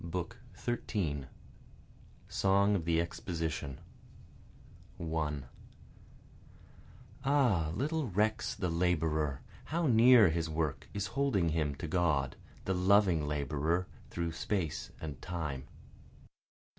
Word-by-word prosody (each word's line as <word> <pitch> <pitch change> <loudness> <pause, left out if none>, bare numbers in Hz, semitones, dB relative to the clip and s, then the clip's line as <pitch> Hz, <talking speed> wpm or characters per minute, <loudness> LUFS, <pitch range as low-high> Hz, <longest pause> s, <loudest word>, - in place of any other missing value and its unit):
BOOK 85 +1 -4 0.2
XIII 85 - -2 1.0
Song 100 +1 +3
of 85 -5 -1
the 85 -1 +2
Exposition 80 -4 -3 1.2
1 75 -4 -2 1.8
(Ah 125 - +3
little 155 +1 -1
recks 105 +3 +1
the 95 -3 -1
laborer, 80 -4 +1 0.2
How 170 +2 -1
near 120 - +7
his 80 0 -1
work 80 -2 -2
is 100 -1 -2
holding 130 -12 +2
him 75 -3 0
to 80 - -5
God, 75 -6 +1 0.3
The 95 - +1
loving 90 -4 +4
Laborer 75 +4 0 0.2
through 85 -1 -2
space 85 -2 -2
and 75 -4 -6
time.) 80 -7 -4
85 Hz, 100 wpm, -32 LUFS, 75-100 Hz, 1.8 s, near